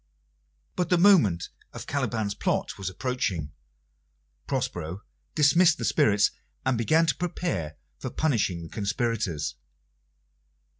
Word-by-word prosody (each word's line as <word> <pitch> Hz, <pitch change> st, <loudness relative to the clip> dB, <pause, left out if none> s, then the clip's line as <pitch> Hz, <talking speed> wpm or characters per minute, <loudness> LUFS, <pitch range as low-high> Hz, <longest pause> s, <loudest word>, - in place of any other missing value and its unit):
But 180 Hz, -2 st, -1 dB
the 180 Hz, -, +4 dB
moment 170 Hz, -, +4 dB, 0.2 s
of -, -, -7 dB
Caliban's 115 Hz, -7 st, -1 dB
plot -, -, -1 dB
was 95 Hz, -2 st, -3 dB
approaching. 95 Hz, -, -2 dB, 1.0 s
Prospero 90 Hz, +3 st, -3 dB, 0.3 s
dismissed 165 Hz, +3 st, +5 dB
the -, -, -3 dB
spirits, 105 Hz, -9 st, +3 dB, 0.3 s
and 130 Hz, -1 st, +2 dB
began 155 Hz, +9 st, +3 dB
to 155 Hz, -, +2 dB
prepare 135 Hz, -, -3 dB, 0.2 s
for -, -, -4 dB
punishing 110 Hz, -, 0 dB
the 80 Hz, -, -9 dB
conspirators. 100 Hz, -8 st, -2 dB
115 Hz, 110 wpm, -27 LUFS, -, 1.0 s, dismissed